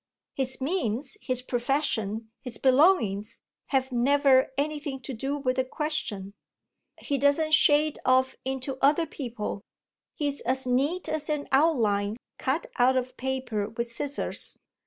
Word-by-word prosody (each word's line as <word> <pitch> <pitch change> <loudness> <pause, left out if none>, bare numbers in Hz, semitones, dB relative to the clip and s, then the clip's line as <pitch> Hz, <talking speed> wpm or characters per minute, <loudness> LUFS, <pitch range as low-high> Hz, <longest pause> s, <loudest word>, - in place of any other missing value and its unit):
His 265 -1 -3
means, 270 - -1
his 255 -1 -2
profession, 235 -4 -1
his 250 -4 -6
belongings 255 - +3 0.3
have 265 -1 0
never 265 +2 +4
anything 290 -1 -2
to 265 - -6
do 270 +5 -2
with 255 -2 -1
the 260 - +3
question. 255 -9 -3 0.6
He 280 -2 -2
doesn't 285 +3 +2
shade 305 0 +4
off 260 +1 +3
into 265 0 -3
other 295 +4 +4
people; 235 -9 -5 0.5
he's 285 -2 -2
as 260 +2 0
neat 280 +9 0
as 310 -1 -3
an 300 -1 -1
outline 225 -8 +2 0.2
cut 275 +5 0
out 255 +2 +5
of 255 0 -2
paper 255 -6 -2
with 235 +1 -3
scissors. 285 +4 -2
265 Hz, 135 wpm, -27 LUFS, 245-290 Hz, 0.6 s, out